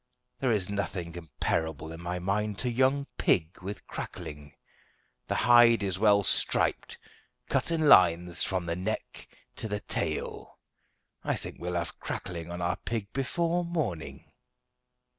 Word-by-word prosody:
There 130 -2 +1
is 100 -5 +1
nothing 95 -4 -3
comparable 80 -2 -3
in 80 +1 -8
my 90 +1 -3
mind 100 +3 -1
to 125 - +1
young 130 +3 +2
pig 85 +1 +1
with 100 +2 -6
crackling. 75 -1 -7 0.7
The - - -1
hide 120 -2 +6
is 95 -2 -1
well 100 -1 +5
striped, - - +2 0.5
cut - - +1
in 160 -2 +1
lines 90 -6 +5
from 95 -2 -1
the 85 0 -2
neck 95 +5 -4 0.3
to - - -2
the 105 -1 -3
tail. - - -3 0.7
I - - 0
think - - -7
we'll 90 0 -3
have 85 -1 -3
crackling 85 -2 -5
on 85 0 -4
our 85 0 0
pig 110 -3 -4
before 170 +6 0
morning." 155 - -3
95 Hz, 140 wpm, -29 LUFS, 85-115 Hz, 0.7 s, hide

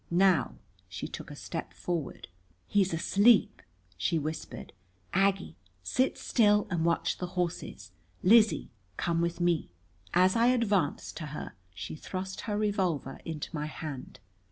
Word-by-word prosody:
Now 180 -3 +3 0.3
she 90 +1 -5
took - - -8
a - - -8
step - - -6
forward. 170 -5 -4 0.4
"He's 195 -2 +2
asleep!" 200 +7 +4 0.3
she 100 - 0
whispered. 155 - -5 0.4
"Aggie, 195 - +1 0.3
sit 255 - +1
still 210 -3 +3
and 170 -2 0
watch 170 0 +1
the 180 - -2
horses. 165 - -3 0.3
Lizzie, 215 +2 +5 0.3
come 170 -1 0
with 170 0 -1
me." 175 - +1 0.4
As 185 +1 +4
I 230 +1 +4
advanced 210 - +1
to 155 - -5
her 150 +1 -6 0.2
she 95 - -6
thrust 190 +4 -5
her 205 - 0
revolver 190 -10 -1
into 160 0 -5
my 150 0 -2
hand. 150 -4 -7
175 Hz, 135 wpm, -30 LUFS, 155-200 Hz, 0.4 s, Lizzie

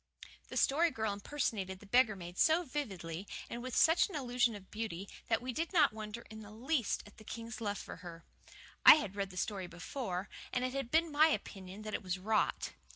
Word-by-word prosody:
The - - -5
Story 325 +5 +4
Girl 220 -6 -1
impersonated 200 -4 -2
the 205 - -14
beggar 230 0 +4
maid 175 -1 -8
so 325 +2 +5
vividly, 195 - -4 0.2
and 235 - -4
with 255 0 -4
such 325 +5 +5
an 385 - -7
illusion 245 -4 +1
of 195 -2 -12
beauty, 210 -4 -4 0.2
that 230 +1 +1
we 255 0 -3
did 330 +6 -2
not 300 -9 +5
wonder 215 +1 -6
in 220 - -8
the 210 -1 -10
least 240 +3 -1
at 205 - -16
the 215 - -13
king's 230 +1 -7
love 205 -2 -1
for - - -8
her. 170 -2 -10 0.6
I - - +12
had 210 -11 -3
read 200 -1 -2
the 185 - -11
story 190 -1 -2
before, 180 +1 -4 0.2
and 250 0 0
it 255 - -2
had 270 -3 -3
been 320 +3 +3
my 300 +2 +6
opinion 195 -9 -4
that 215 0 -5
it - - -1
was 185 -1 -2
"rot." 215 +3 0
220 Hz, 215 wpm, -34 LUFS, 195-260 Hz, 0.6 s, I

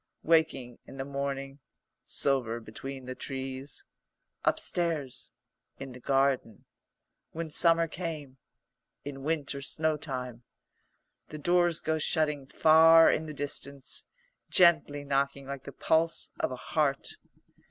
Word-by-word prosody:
"Waking 155 -7 +1
in 135 - -11
the 135 - -4
morning 140 0 -4 0.2
" - - -57
"Silver 125 -5 0
between 130 +4 -8
the 130 - -5
trees 135 +1 -6 0.3
" 65 0 -52
"Upstairs 160 -7 -2 0.2
" 65 +1 -54
"In 135 -1 -7
the 125 - -11
garden 135 -4 0 0.3
" - - -56
"When 160 -1 -5
summer 165 +1 +4
came 155 -6 -6 0.3
" - - -51
"In 140 -1 -6
winter 145 -2 -2
snowtime 135 -5 -2 0.4
" - - -49
The 155 - -7
doors 175 +1 +2
go 160 0 0
shutting 150 -3 0
far 165 +2 +7
in 160 - -1
the - - -5
distance, 140 -1 -4 0.4
gently 165 -5 +4
knocking 140 0 -1
like 135 -1 -7
the - - -7
pulse 160 +4 +1
of - - 0
a - - -3
heart. 140 +1 -1
140 Hz, 135 wpm, -29 LUFS, 135-160 Hz, 0.4 s, far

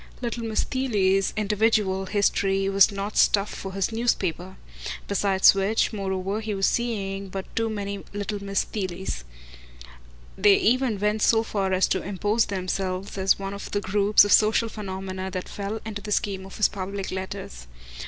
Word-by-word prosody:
Little 235 -1 -4
Miss 220 -1 0
Theale's 195 -7 +1
individual 210 -2 +1
history 195 -1 +1
was 195 +1 +5
not 200 +1 -4
stuff 200 0 +3
for 190 -1 -7
his 195 +3 -1
newspaper; 190 -6 -1 0.5
besides 195 -1 +4
which, 195 +4 +1
moreover, 195 +1 -2
he 215 -2 -3
was 195 0 +1
seeing 200 -5 -1
but 190 0 -5
too 225 0 0
many 200 -2 -4
little 205 0 -4
Miss 195 0 0
Theales. 185 - -4 1.1
They 200 +1 +5
even 245 -1 +2
went 210 +1 0
so 225 +1 +4
far 195 -4 -2
as 185 0 +3
to 190 - 0
impose 205 +3 0
themselves 185 0 -3
as 190 0 +3
one 195 0 -5
of 200 - -7
the 205 - -1
groups 205 +1 +4
of 205 - -1
social 220 +1 +4
phenomena 190 -2 -5
that 185 -1 -5
fell 205 +2 -4
into 210 -2 -5
the 210 - -7
scheme 195 -2 -1
of 195 - -11
his 210 - +4
public 195 0 -5
letters. 125 - -6
200 Hz, 165 wpm, -25 LUFS, 190-210 Hz, 1.1 s, was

